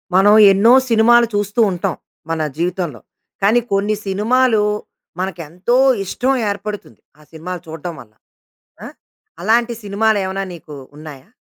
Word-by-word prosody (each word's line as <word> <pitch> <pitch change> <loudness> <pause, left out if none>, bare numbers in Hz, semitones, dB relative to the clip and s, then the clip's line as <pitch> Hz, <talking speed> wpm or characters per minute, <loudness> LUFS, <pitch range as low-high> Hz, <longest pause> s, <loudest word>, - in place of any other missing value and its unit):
మనం 205 +2 +5 0.2
ఎన్నో 210 +6 +4 0.2
సినిమాలు 235 +1 +4
చూస్తూ 205 +3 0
ఉంటాం, 180 -2 -3 0.3
మన 165 0 -2 0.2
జీవితంలో. 175 - -3 0.4
కానీ 210 +5 +4
కొన్ని 205 +2 +1
సినిమాలు, 220 +4 +2 0.6
మనకెంతో 180 +4 -3 0.3
ఇష్టం 255 +8 -1 0.2
ఏర్పడుతుంది. 205 0 -6 0.2
ఆ - - -19
సినిమాలు 170 +2 -7
చూడడం 160 +2 -7
వల్ల. 110 -2 -18 0.7
ఆ! - - -7 0.6
అలాంటి 235 +4 +1
సినిమాలేమైనా 200 -2 -1
నీకు 155 -3 -12 0.2
ఉన్నాయా? 150 0 -12
195 Hz, 115 wpm, -18 LUFS, 175-220 Hz, 0.7 s, మనం